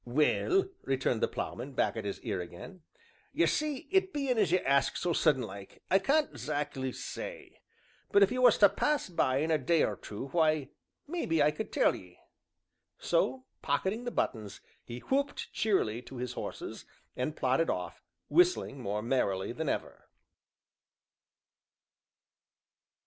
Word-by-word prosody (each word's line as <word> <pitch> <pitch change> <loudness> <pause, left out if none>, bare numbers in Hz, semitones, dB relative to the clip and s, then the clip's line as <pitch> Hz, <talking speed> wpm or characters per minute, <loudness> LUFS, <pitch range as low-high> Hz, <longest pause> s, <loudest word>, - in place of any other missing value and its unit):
"Well," 150 - +2 0.2
returned 130 -3 0
the - - +3
Ploughman, 130 +4 -5
back - - +1
at 110 -2 -4
his 100 - -4
ear 100 -6 -2
again, 90 - -10 0.5
"ye - - +3
see 300 -3 -1
it 380 0 +3
bein' 275 -6 0
as 165 - +3
you 185 - +5
ask 140 -5 +2
so 175 -1 0
sudden 150 -6 +3
like, 100 -2 -10
I 190 - +6
can't 295 +9 +1
'zack'ly 145 -3 -3
say, - - -8 0.5
but 200 - +6
if 195 - +3
you 255 - -1
was 245 -3 +6
to 205 - +7
pass 300 +7 0
by 130 -7 +1
in 155 +3 0
a 155 - +3
day 160 +5 +2
or - - 0
two, 110 +6 -7
why, 155 -3 +2 0.4
maybe 170 - +1
I 150 - +4
could 150 - -6
tell - - +3
ye." 90 -1 -13 0.8
So, 130 +1 0 0.2
pocketing 190 - -1
the - - -1
buttons, 105 - -2 0.2
he 120 0 -8
whooped 280 - -1
cheerily 125 - +1
to 130 +2 -12
his 125 0 -4
horses, - - -6 0.3
and 140 +5 -2
plodded 130 +6 +2
off, - - -3 0.3
whistling 360 - +3
more 105 -1 -2
merrily 100 -6 0
than 155 +4 -3
ever. - - -4
145 Hz, 155 wpm, -31 LUFS, 125-205 Hz, 0.8 s, to